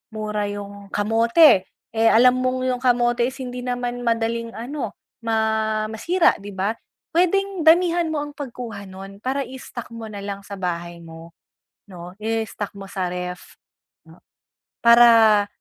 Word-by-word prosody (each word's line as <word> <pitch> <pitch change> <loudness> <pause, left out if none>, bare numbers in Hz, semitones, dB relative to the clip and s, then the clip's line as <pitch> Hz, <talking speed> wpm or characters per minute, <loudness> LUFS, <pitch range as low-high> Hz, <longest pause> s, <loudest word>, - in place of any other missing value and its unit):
mura 210 -1 -2
'yung 200 0 -7
kamote, 225 - +4 0.2
eh, 225 0 +2
alam 250 +3 +5
mong 255 0 -1
'yung 255 -1 0
kamote 240 -1 +2
is 260 - -6
hindi 250 0 -6
naman 245 -1 -3
madaling 230 0 -1
ano 270 +6 -5 0.2
ma 225 -1 -1 0.6
masira 335 - +2
di 200 -1 -9
ba, 195 +3 0 0.4
puwedeng 375 +2 +1
damihan 340 0 +4
mo 300 -2 -2
ang 295 - -7
pagkuha 235 -8 -7
nun 195 +1 -10
para 270 +4 -2
i-stock 250 -2 -9
mo 225 -1 -7
nalang 200 -1 -6
sa 200 0 -9
bahay 175 -2 -5
mo 165 0 -12 0.5
'no, 180 -1 -11
i-stock 220 -2 -3
mo 195 -1 -10
sa 185 -2 -3
ref. 180 0 -7 1.3
Para 230 -3 +7
225 Hz, 140 wpm, -22 LUFS, 200-250 Hz, 1.3 s, Para